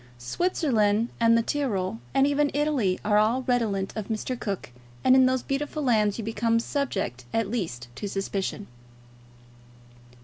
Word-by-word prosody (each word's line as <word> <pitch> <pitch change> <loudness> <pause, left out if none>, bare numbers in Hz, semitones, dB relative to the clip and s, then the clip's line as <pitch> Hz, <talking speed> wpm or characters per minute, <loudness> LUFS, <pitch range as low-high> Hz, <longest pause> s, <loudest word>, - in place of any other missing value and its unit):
Switzerland 225 - +1
and 230 0 +5
the 230 - +2
Tyrol, 200 - -1
and 270 - +4
even 285 +1 +2
Italy, 280 -11 +1
are 210 0 +4
all 230 +5 +2
redolent 220 -6 0
of 215 -3 -4
Mr. 225 +3 -2
Cook, 200 - -4 0.3
and 260 - +6
in 260 -1 +6
those 260 -1 0
beautiful 295 +2 -2
lands 215 -5 +2
you 230 - -4
become 230 +1 +1
subject 195 - -2
at 225 -3 0
least 140 - -3
to 205 - -4
suspicion. 195 +1 -3
225 Hz, 145 wpm, -26 LUFS, 200-260 Hz, 0.3 s, and